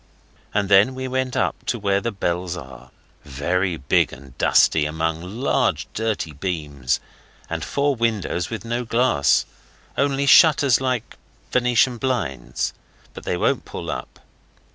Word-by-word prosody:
And 105 Hz, -1 st, 0 dB
then 100 Hz, +6 st, +5 dB
we 130 Hz, 0 st, -4 dB
went 130 Hz, 0 st, -2 dB
up -, -, -1 dB
to 120 Hz, -, 0 dB
where 100 Hz, -2 st, +1 dB
the 115 Hz, -, -2 dB
bells 90 Hz, -3 st, -2 dB
are, 65 Hz, -3 st, -11 dB, 0.3 s
very 85 Hz, +6 st, -1 dB
big 70 Hz, -, +2 dB
and 70 Hz, -2 st, -13 dB
dusty 75 Hz, -2 st, +4 dB
among 80 Hz, +1 st, -2 dB
large 105 Hz, +9 st, 0 dB
dirty 110 Hz, -8 st, -2 dB
beams; 75 Hz, -6 st, -2 dB, 0.5 s
and -, -, -2 dB
four 140 Hz, 0 st, 0 dB
windows 110 Hz, -6 st, -1 dB
with 100 Hz, -, -6 dB
no 120 Hz, +1 st, -2 dB
glass, 115 Hz, -, +2 dB, 0.5 s
only 140 Hz, 0 st, +1 dB
shutters 140 Hz, -4 st, +6 dB
like 125 Hz, -3 st, -2 dB, 0.3 s
Venetian 125 Hz, 0 st, +2 dB
blinds, 125 Hz, -, -2 dB, 0.4 s
but -, -, -10 dB
they -, -, -1 dB
won't -, -, +1 dB
pull -, -, -6 dB
up. 60 Hz, -, -7 dB
100 Hz, 140 wpm, -22 LUFS, 80-125 Hz, 0.5 s, shutters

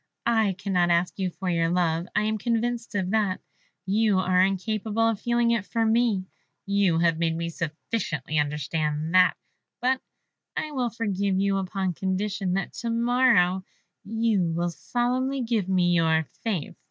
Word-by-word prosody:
I 220 Hz, -4 st, +2 dB
cannot 180 Hz, -2 st, 0 dB
ask 175 Hz, +3 st, +1 dB
you 190 Hz, -1 st, 0 dB
for 185 Hz, +2 st, -7 dB
your 165 Hz, -2 st, +1 dB
love, 170 Hz, -1 st, 0 dB
I -, -, +3 dB
am 215 Hz, 0 st, -1 dB
convinced 235 Hz, 0 st, -1 dB
of 190 Hz, -2 st, -1 dB
that; 210 Hz, -4 st, +1 dB, 0.5 s
you 205 Hz, +1 st, +2 dB
are 185 Hz, -1 st, +3 dB
incapable 215 Hz, +3 st, 0 dB
of 225 Hz, -3 st, 0 dB
feeling 235 Hz, 0 st, +2 dB
it 230 Hz, -4 st, +1 dB
for 225 Hz, +3 st, -1 dB
me; 220 Hz, -4 st, +2 dB, 0.4 s
you 200 Hz, -4 st, +2 dB
have 165 Hz, -1 st, +2 dB
made 165 Hz, -1 st, 0 dB
me 170 Hz, 0 st, -2 dB
sufficiently 155 Hz, -, -3 dB
understand 150 Hz, +2 st, -1 dB
that; 180 Hz, -3 st, +5 dB, 0.4 s
but 255 Hz, +1 st, +1 dB, 0.6 s
I 305 Hz, -, -2 dB
will 255 Hz, -4 st, -1 dB
forgive 200 Hz, -4 st, -1 dB
you 195 Hz, 0 st, +1 dB
upon 190 Hz, -1 st, -2 dB
condition 190 Hz, +1 st, -2 dB
that 195 Hz, -1 st, -2 dB
to 235 Hz, -, -3 dB
morrow 230 Hz, -6 st, +3 dB, 0.4 s
you 225 Hz, -1 st, +1 dB
will 170 Hz, +1 st, -1 dB
solemnly 255 Hz, +6 st, -1 dB
give 225 Hz, -5 st, -1 dB
me 180 Hz, -2 st, +3 dB
your 160 Hz, -1 st, +3 dB, 0.2 s
faith." 195 Hz, -10 st, -2 dB
195 Hz, 155 wpm, -26 LUFS, 175-225 Hz, 0.6 s, that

